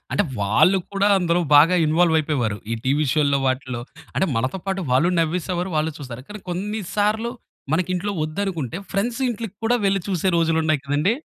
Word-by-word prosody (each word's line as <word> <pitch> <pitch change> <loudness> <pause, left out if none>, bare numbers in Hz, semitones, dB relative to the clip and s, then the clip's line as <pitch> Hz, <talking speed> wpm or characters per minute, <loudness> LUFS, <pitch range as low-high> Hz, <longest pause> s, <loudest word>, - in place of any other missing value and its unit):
అంటే, 205 - +2 0.2
వాళ్ళు 110 - +4
కూడా 200 +1 +2
అందులో 175 -1 +1 0.2
బాగా 165 +5 +6
ఇన్వాల్వయిపోయేవారు. 155 -8 +2 0.2
ఈ - - +1
టీవీ 145 +4 +2
షోల్లో 145 -2 +2
వాటిల్లో. 130 -2 -2 0.3
అంటే, 190 - +1
మనతో 130 +10 -1
పాటు 195 0 -1
వాళ్ళు 145 +7 +4
నవ్వేసేవారు, 180 +2 -1
వాళ్ళు 155 +1 0
చూస్తారు, 130 -3 -8
కానీ 210 0 -8
కొన్ని 210 +5 -3
సార్లు 215 +3 +1 0.4
మనకింట్లో 185 +4 0
ఒద్దనుకుంటే 160 - -3
ఫ్రెండ్స్ 230 +4 -1
ఇంటిలికి 225 -3 -5
కూడా 245 +2 +3
వెళ్లి 195 0 +2
చూసే 190 -1 0
రోజులున్నాయి 160 -2 +2
కదండీ? 145 +8 +1
170 Hz, 155 wpm, -22 LUFS, 150-195 Hz, 0.4 s, బాగా